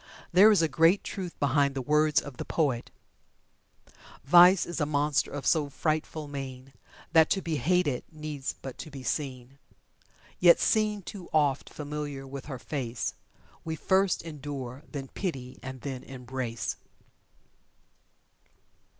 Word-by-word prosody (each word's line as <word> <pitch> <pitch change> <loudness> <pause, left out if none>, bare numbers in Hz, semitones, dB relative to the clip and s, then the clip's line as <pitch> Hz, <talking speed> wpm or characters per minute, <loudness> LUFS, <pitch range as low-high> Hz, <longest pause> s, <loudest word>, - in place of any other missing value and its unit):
There 200 +5 +8
is 200 -6 +4
a - - +3
great 165 +6 +4
truth 185 -3 -6
behind 140 0 +2
the 135 - -1
words 150 0 +3
of 140 -4 -9
the - - -4
poet: 135 -7 -1 1.3
"Vice 175 +5 +7
is 175 -2 -4
a 150 - +1
monster 145 -1 +1
of 145 -1 -6
so 150 -3 +2
frightful 155 +2 -2
mien, 135 -2 -7 0.4
That 160 -1 +6
to 195 - +2
be 160 -2 -1
hated 175 -6 +1
needs 150 -3 -5
but 135 -2 -7
to - - -7
be 135 -3 -9
seen. 135 -2 -4 0.8
Yet 175 -1 +7
seen 210 -2 +1
too 180 0 -9
oft, 145 -3 +1
familiar 145 -2 -5
with 135 0 -8
her 135 -3 -6
face, 125 -4 -3 0.5
We 160 0 -3
first 190 +3 +2
endure, 140 -5 -6
then 140 -3 -5
pity, 135 -9 -5
and 130 -1 -7
then 130 -1 -5
embrace." 125 -3 -5
145 Hz, 140 wpm, -28 LUFS, 135-165 Hz, 1.3 s, There